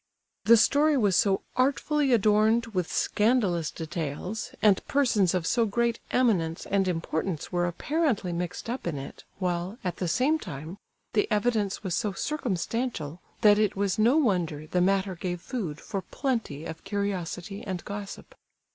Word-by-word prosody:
The 230 +2 +8
story 290 +6 +4
was 205 -7 +3
so 195 +1 +3
artfully 280 +2 +2
adorned 220 +1 +4
with 180 -3 -1
scandalous 210 -8 +1
details, 160 +6 -4
and 205 -3 +4
persons 220 -10 +2
of 175 -3 -1
so 230 +5 +2
great 235 +2 0
eminence 185 -10 +1
and 195 -1 +1
importance 165 -1 -2
were 175 0 +1
apparently 235 - 0
mixed 175 +3 -4
up 240 -4 -4
in 160 -4 -2
it, 135 - -8
while, 180 +2 -2
at 180 -2 -3
the 180 - -2
same 275 - +2
time, 155 - -7 0.3
the 210 - +2
evidence 210 -2 0
was 185 -3 -2
so 205 +2 0
circumstantial, 225 - -3 0.2
that 210 -1 +6
it 210 -2 +2
was 200 +1 0
no 240 +7 +5
wonder 175 - +1
the 180 +3 0
matter 195 +1 +2
gave 175 0 -4
food 175 - -4
for 195 - -4
plenty 225 - -3
of 160 0 -7
curiosity 195 -1 -3
and 185 -3 -5
gossip. 205 -1 -7
200 Hz, 155 wpm, -27 LUFS, 175-230 Hz, 0.3 s, The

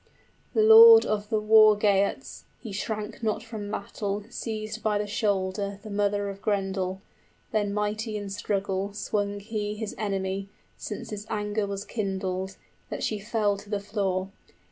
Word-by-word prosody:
The 435 - +4
lord 450 +1 +10
of 210 -1 -2
the 220 -2 +1
War 215 0 +6
Geats 200 -1 0
(He 225 - -8
shrank 210 +2 -4
not 215 -1 -1
from 220 -3 -6
battle) 205 0 -3
seized 220 -1 -5
by 210 0 +1
the 210 - -1
shoulder 200 -1 -1
The 215 - -8
mother 205 0 0
of 200 0 -7
Grendel; 195 -2 -1 0.5
then 205 -2 0
mighty 210 +1 -2
in 205 -1 -6
struggle 195 -1 -2
65 - - -10
Swung 205 -1 -1
he 210 0 -3
his 210 -1 -5
enemy, 195 -1 -2 0.3
since - - -7
his 210 0 -6
anger 210 0 -1
was 200 0 -4
kindled, 190 -3 -3 0.3
That - - -4
she 215 - -1
fell 210 -1 0
to 200 +1 -13
the 205 -1 -1
floor. 195 -2 -2
205 Hz, 160 wpm, -27 LUFS, 200-215 Hz, 0.5 s, lord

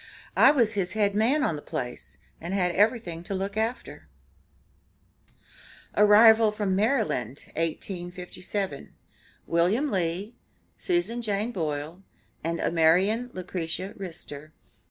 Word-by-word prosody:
I - - +7
was 235 -7 +3
his 190 -3 -1
head 205 -2 +2
man 245 +8 +2
on 165 - 0
the 145 - -7
place, 125 -3 -6 0.2
and 175 +4 -4
had 180 -3 +1
everything 205 -5 +1
to 195 - -3
look 195 +1 -3
after." 225 +3 -3 1.9
ARRIVAL 215 +1 +6
FROM 205 -3 -1
MARYLAND, 205 - 0
1857. 180 +1 -4 0.5
WILLIAM 195 - +1
LEE, 185 +4 -1 0.4
SUSAN 345 - -1
JANE 215 +1 -1
BOILE 155 -2 -4 0.4
AND 165 +1 -2
AMARIAN 185 +9 +2
LUCRETIA 185 +1 -4
RISTER. 155 -5 -9
195 Hz, 110 wpm, -26 LUFS, 170-220 Hz, 1.9 s, I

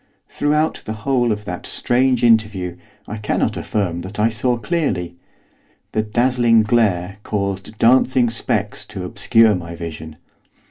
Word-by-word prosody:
Throughout 150 +2 0
the 110 - -4
whole 125 -4 +2
of 105 0 -3
that - - -6
strange 125 0 +1
interview 105 -6 +2 0.3
I 105 - -5
cannot 105 - -1
affirm 90 -5 -2
that 95 +4 -8
I 110 +2 +3
saw 120 +2 0
clearly; 110 - -2 0.8
the 110 - 0
dazzling 120 +1 +2
glare 100 -4 0
caused 100 0 -4
dancing 125 0 +3
specks 105 -2 -2
to 95 - -7
obscure 110 +4 +4
my 85 -2 -5
vision. 80 -2 -7
110 Hz, 135 wpm, -19 LUFS, 95-120 Hz, 0.8 s, obscure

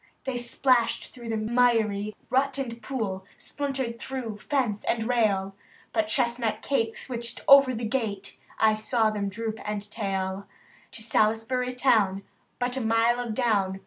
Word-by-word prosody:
They 260 -2 -2
splashed 240 0 +1
through 240 -2 -9
miry 220 -2 +1 0.2
rut 275 +2 +2
and 235 -4 -4
pool, 215 -9 -3
— - - -27
SpUntered 265 -5 -3
through 235 -6 -5
fence 245 -8 -1
and 225 - 0
rail, 205 -5 +1 0.4
But 220 -2 +1
chestnut 230 -1 0
Kate 230 -5 0
switched 235 -2 -5
over 275 -2 +8
the 230 +1 -3
gate, 215 -5 -3
— - - -22
I - - +2
saw 215 +1 +1
them 205 -2 -2
droop 220 +2 -4
and 210 -1 -4
tail. 195 -2 -3 0.5
To 220 - -6
Salisbury 225 +3 +1
town— 215 -7 +3 0.3
but 245 +1 -1
a - - -1
mile 225 +1 +3
of 235 -3 -3
down. 200 -6 +1
230 Hz, 150 wpm, -27 LUFS, 215-250 Hz, 0.5 s, over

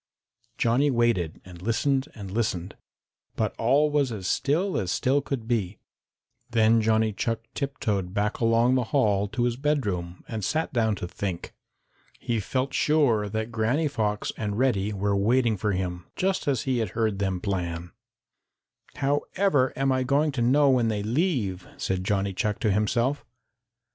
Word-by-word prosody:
Johnny 125 +5 +3
waited 120 - +1
and 90 -2 -12
listened 130 +6 +1
and 100 -3 -8
listened, 95 -5 -2 0.6
but - - -1
all 140 +6 +3
was 145 -4 +1
as 100 -5 -5
still 165 - +1
as 90 -5 -1
still 135 +3 +2
could 130 -5 -4
be. 110 -5 -1 0.7
Then 115 -1 +4
Johnny 110 0 +2
Chuck 115 +2 -2
tiptoed 105 -10 -2
back 105 +2 -1
along 115 +2 +3
the 130 -2 +2
hall 105 -6 +2
to 120 +4 -2
his 120 -1 0
bedroom 105 - -1
and 110 -3 -4
sat 160 - -1
down 110 -3 +2
to 90 - -5
think. 90 -1 -5 0.6
He 115 -2 -2
felt 130 +6 -2
sure 125 -9 +2
that 110 +2 -3
Granny 120 +8 +1
Fox 105 -7 -1
and 105 -1 -3
Reddy 110 -6 +1
were 100 0 0
waiting 115 +3 +2
for 105 +1 -1
him, 90 -2 -3
just 190 -3 -1
as 135 -5 +1
he 130 -2 0
had 110 -4 -1
heard 110 -4 0
them 95 -2 -1
plan. 90 -3 -3 1.0
"However 145 +1 +1
am 135 0 +1
I 130 0 +1
going 140 +4 +2
to 130 -3 -2
know 140 +5 +4
when 125 -3 +3
they 105 -2 -1
leave?" 115 - -1
said 95 -1 -2
Johnny 100 0 0
Chuck 105 +2 -1
to 110 - +2
himself. 115 +7 +1
115 Hz, 160 wpm, -26 LUFS, 100-135 Hz, 1.0 s, Then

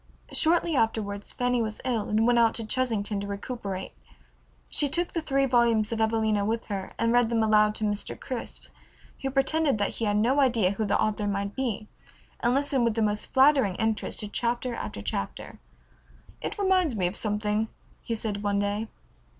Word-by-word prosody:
Shortly 335 0 +3
afterward 210 -4 0
Fanny 245 +1 -1
was 215 -1 -3
ill 235 -5 -1
and 215 +1 +2
went 240 0 +4
out 230 -1 +4
to 230 - -1
Chesington 215 -4 -1
to 200 - -5
recuperate. 200 -2 -5 0.8
She 290 - +2
took 345 +5 -1
the 330 - -1
three 275 -3 +1
volumes 235 -4 +3
of 225 -1 -1
"Evelina" 220 -2 +1
with 225 +2 -1
her, 195 -2 -4
and 230 0 +1
read 245 -2 +4
them 230 -1 +2
aloud 215 -1 +4
to 220 - -4
Mr. 205 -1 -2
Crisp, 255 -3 -6 0.6
who 270 - -1
pretended 275 0 +2
that 205 -1 0
he 225 - -1
had 205 0 +1
no 245 +7 +3
idea 235 -8 +3
who 215 +2 -2
the 205 - +1
author 210 -1 0
might 200 0 -2
be 230 -5 -2 0.5
and 245 +1 +2
listened 275 -2 +2
with 230 -2 +1
the 225 - +1
most 210 0 -1
flattering 265 -8 +4
interest 220 0 -1
to 210 - -4
chapter 240 +3 -2
after 100 - -6
chapter. 100 -1 -5 0.8
"It - - -4
reminds 375 - +2
me 185 -4 0
of 180 +3 -1
something," 210 0 0 0.3
he 230 - -3
said 215 -2 -3
one 205 -1 0
day. 205 +2 -1
225 Hz, 185 wpm, -27 LUFS, 210-250 Hz, 0.8 s, went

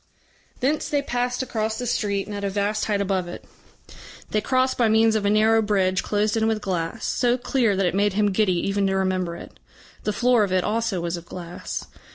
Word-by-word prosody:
Thence 290 +4 0
they 290 -1 0
passed 245 -1 -1
across 220 -3 -2
the 250 - -4
street 200 -4 -1
and 210 - -6
at 200 - -5
a 200 - 0
vast 205 +2 -1
height 205 -2 0
above 190 -2 -1
it. 175 - -8 0.9
They 215 - +1
crossed 260 +3 +1
by 235 -3 +2
means 220 +1 +4
of 210 -2 +1
a - - +3
narrow 220 +2 +4
bridge 190 -3 +1
closed 210 +1 0
in 220 0 +2
with 220 -1 +1
glass, 185 +1 -3
so 245 0 +1
clear 240 -4 +1
that 195 0 +1
it 180 - +1
made 200 +1 +2
him 205 0 +2
giddy 185 -3 +1
even 195 0 +1
to 190 - 0
remember 185 -2 0
it. - - -12 0.4
The 210 - 0
floor 245 0 +3
of 200 - -2
it 185 -1 +2
also 215 -4 -1
was 170 0 -2
of 170 0 -11
glass. 175 -1 -6
210 Hz, 215 wpm, -24 LUFS, 190-225 Hz, 0.9 s, means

